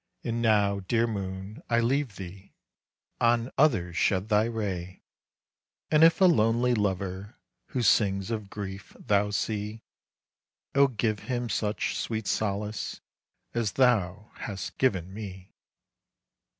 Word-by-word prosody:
And 115 0 -2
now, 105 -3 +3
dear 115 +5 +1
moon, 95 -1 -5
I 115 -1 +3
leave 125 -1 0
thee. 95 +1 -10 0.6
On 120 +1 +2
others 110 - +2
shed 95 +2 +1
thy 105 0 +4
ray. 95 -6 -4 0.9
"And 155 0 +6
if 165 0 +6
a 190 - +6
lonely 120 -6 +3
lover 100 -1 -2 0.3
Who 125 - -2
sings 100 -1 +3
of 105 -3 -4
grief, 100 -1 -7
thou 105 0 +2
see, 105 +1 -3 0.9
Oh 140 0 +6
give 110 -4 -1
him 120 -1 -1
such 105 -1 -1
sweet 110 -2 -3
solace 105 +1 -2 0.5
As 115 -4 -1
thou 105 -5 +2
hast 100 -3 -6
given 95 -8 +1
me." 95 -3 -8
105 Hz, 125 wpm, -28 LUFS, 100-115 Hz, 0.9 s, And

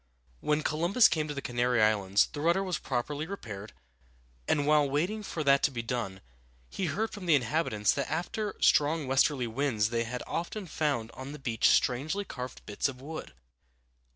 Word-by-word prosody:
When 150 - 0
Columbus 175 +9 +4
came 155 -3 -1
to 150 - -4
the 140 - -5
Canary 120 -1 +1
Islands 105 -2 +3
the 145 - -4
rudder 170 +5 +2
was 185 -5 -2
properly 145 +4 -3
repaired, 110 - -7 0.8
and 145 -2 +2
while 150 -1 +4
waiting 175 +10 0
for 170 -6 -4
that 140 -1 +4
to - - +3
be 120 -4 -5
done, 115 -6 -3 0.5
he 185 - -2
heard 210 +9 -1
from 195 -4 -8
the 160 - +6
inhabitants 125 -5 +1
that 140 -1 -2
after 180 +7 -2
strong 150 +1 +3
westerly 135 0 +2
winds 115 -3 0
they 115 0 0
had 125 +2 -5
often 190 +4 -4
found 145 -9 -1
on 130 +2 -8
the - - -7
beach 120 -5 +2
strangely 155 +11 +1
carved 125 -6 -7
bits 105 +6 -1
of 130 -1 -9
wood. 155 - -7
145 Hz, 180 wpm, -29 LUFS, 120-160 Hz, 0.8 s, the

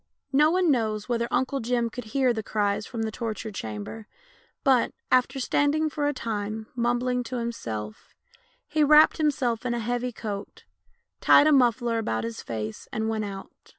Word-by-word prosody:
No 300 +3 +5
one 360 -1 +3
knows 215 -5 0
whether 235 -1 0
Uncle 270 +1 0
Jim 235 -1 0
could 245 -1 -7
hear 255 +2 +1
tlie 220 -1 -4
cries 205 0 -1
from 230 -3 -4
the 220 - -2
torture 220 -1 -4
chamber, 110 - -6 0.6
but, 260 -3 +3 0.2
after 255 +2 +3
standing 295 +4 +1
for 290 -1 -1
a - - +2
time 220 -3 -4
mumbling 245 +1 0
to 255 - -5
himself, 110 - -5 0.5
he 305 0 +2
wrapped 300 +2 +6
himself 265 -7 0
in 245 -1 -1
a - - -2
heavy 245 +2 -2
coat, 210 -3 -7 0.6
tied 290 - +6
a 310 - +5
muffler 240 -3 +3
about 110 - -2
his 115 0 -5
face, 110 -1 -5
and 220 0 -1
went 220 -1 -1
out. 195 -1 -7
235 Hz, 170 wpm, -26 LUFS, 215-260 Hz, 0.6 s, wrapped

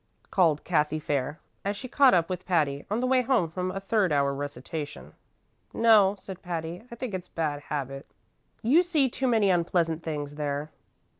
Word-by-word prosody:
called 165 -6 +3
Cathy 155 -3 +1
Fair, 145 0 -2 0.2
as 200 +1 -2
she 255 - -6
caught 265 -2 +5
up 165 -2 +2
with 185 -1 -4
Patty 150 -6 0
on 215 +4 0
the - - +1
way 255 0 +3
home 235 -10 +1
from 180 +1 -2
a 195 - -3
third 195 -2 +1
hour 140 -1 +2
recitation. 145 +2 -6 0.6
"No," 215 -4 +5
said 190 -1 -9
Patty; 170 -1 -4
"I 235 - -8
think 235 -2 -5
it's 185 -1 -4
a - - -38
bad 150 -3 -1
habit. 135 -1 -4 0.6
You 275 +10 +5
see 315 -7 +1
too 260 +2 -1
many 220 -5 +3
unpleasant 170 -2 +1
things 145 -3 -4
there." 145 0 -3
175 Hz, 180 wpm, -27 LUFS, 150-210 Hz, 0.6 s, caught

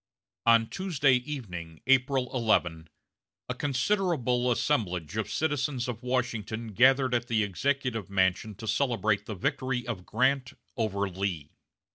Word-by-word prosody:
On 115 -1 +6
Tuesday 155 -7 +1
evening, 95 - -7
April 130 0 +2
11, 85 -10 +1 0.6
a - - -2
considerable 135 - 0
assemblage 90 - 0
of 110 -1 -2
citizens 145 -4 -1
of 120 -2 -5
Washington 115 -3 -2
gathered 130 +4 +4
at 120 0 0
the 110 -2 +2
Executive 125 +2 -1
Mansion 100 +2 +1
to 110 +3 -8
celebrate 110 -4 +1
the 110 - -4
victory 125 +6 -1
of 105 -7 -5
Grant 130 +3 +1 0.2
over 100 -4 -1
Lee. 90 -5 -3
120 Hz, 125 wpm, -28 LUFS, 100-130 Hz, 0.6 s, On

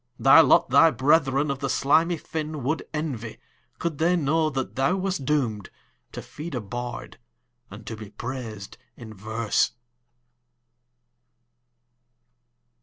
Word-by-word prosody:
Thy - - +7
lot - - +4
thy 165 - +7
brethern 140 +1 +2
of 135 - -4
the 135 0 -3
slimy 160 +6 +2
fin 155 -2 -5
Would 150 +6 -2
envy, 135 -8 -4 0.4
could 165 -4 -4
they 170 +3 +3
know 160 0 +1
that 135 -3 -4
thou 135 +7 +1
wast 190 -7 -3
doom'd 120 -9 -1 0.4
To - - -7
feed 155 -1 -8
a - - -1
bard, 120 +3 -7 0.5
and 105 +2 -11
to 115 - -6
be 110 -2 -10
prais'd 110 -2 -7 0.2
in 110 -2 -10
verse. 110 +2 -1
135 Hz, 125 wpm, -25 LUFS, 115-155 Hz, 0.5 s, Thy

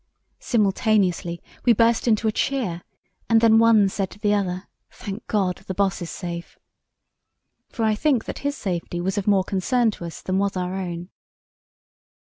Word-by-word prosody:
Simultaneously 200 -6 +1 0.2
we 240 - +5
burst 230 +2 +2
into 220 -1 +2
a - - +3
cheer, 215 -9 -1 0.5
and 225 -1 +6
then 225 -1 +5
one 225 -3 +5
said 195 0 -2
to - - -14
the 210 0 +1
other, 185 -2 -1 0.2
'Thank 205 +3 -8
God, 190 -5 0
the 190 - -4
Boss 195 -2 0
is 170 - -5
safe.' 170 -2 -6 1.1
For 225 - -2
I 215 - +3
think 255 +1 +1
that - - -6
his 285 0 -2
safety 175 -2 -3
was 190 +3 -1
of 200 - -6
more 195 -2 +4
concern 220 +5 +1
to 175 - -8
us 165 - -8
than 185 +1 0
was 200 -1 0
our 180 0 -2
own. 175 -2 -5
200 Hz, 170 wpm, -23 LUFS, 185-225 Hz, 1.1 s, and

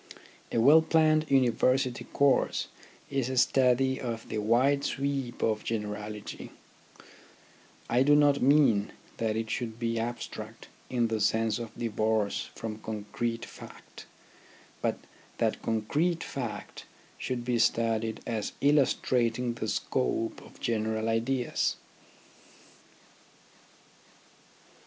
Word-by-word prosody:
A - - -1
well 145 +7 +7
planned 155 -1 +3
University 130 -1 +2
course 140 -1 +1 0.4
is 135 -3 0
a 130 - -3
study 130 +1 +3
of 115 -3 -4
the - - -2
wide 130 +6 +3
sweep 135 -3 -2
of 110 -1 +1
generality, 105 -1 -5 1.4
I 120 +2 +2
do 145 +2 +5
not 145 -1 +4
mean 130 -7 +4 0.2
that 110 -1 -1
it 110 0 -3
should 115 -3 -3
be 115 -1 -1
abstract 120 +1 -6 0.2
in 120 -2 +1
the 110 -1 -1
sense 110 +1 +1
of 115 -1 -5
divorce 110 -2 0
from 110 -1 -5
concrete 110 +2 -4
fact, - - -13 0.7
but - - 0 0.4
that - - 0
concrete 150 +10 0
fact 125 -5 -6 0.3
should 120 -2 -3
be 120 -1 +1
studied 115 -1 +1
as 110 -3 -3
illustrating 125 -4 +2
the 110 -2 -4
scope 115 0 -1
of - - -16
general 110 -1 -1
ideas. 120 +3 0
120 Hz, 110 wpm, -29 LUFS, 110-135 Hz, 1.4 s, well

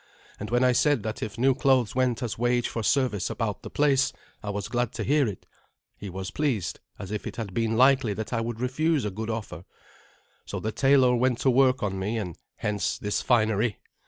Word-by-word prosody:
And 105 - -5
when 120 +2 +2
I 125 - +5
said 140 -2 +2
that 110 0 -4
if 110 +1 -5
new 130 +3 +4
clothes 130 -3 +2
went 130 -1 0
as 120 - -3
wage 120 +1 +1
for 115 - -4
service 125 -3 +1
about 110 -4 -3
the - - -8
place 140 -2 +2 0.3
I 105 - -5
was 100 -1 -3
glad 120 -1 -1
to - - -3
hear 145 -1 +2
it, 100 -4 -6 0.5
he 100 - -8
was 95 +1 -5
pleased, 130 - -1 0.2
as 100 -1 -8
if 105 - -4
it - - -6
had 105 -5 -5
been 115 0 0
likely 130 -4 +4
that 110 +3 -5
I 115 - 0
would 115 0 -4
refuse 140 +3 0
a 105 - -2
good 110 +3 -5
offer. 110 -6 -5 0.8
So - - -4
the 110 - -3
tailor 130 0 +4
went 125 0 +2
to 130 - +4
work 130 -1 +3
on 95 -2 -2
me, 105 +5 -2
and 90 -7 -4 0.2
hence 105 -5 -1
this 105 0 -2
finery. 110 -2 +2
115 Hz, 215 wpm, -26 LUFS, 105-130 Hz, 0.8 s, I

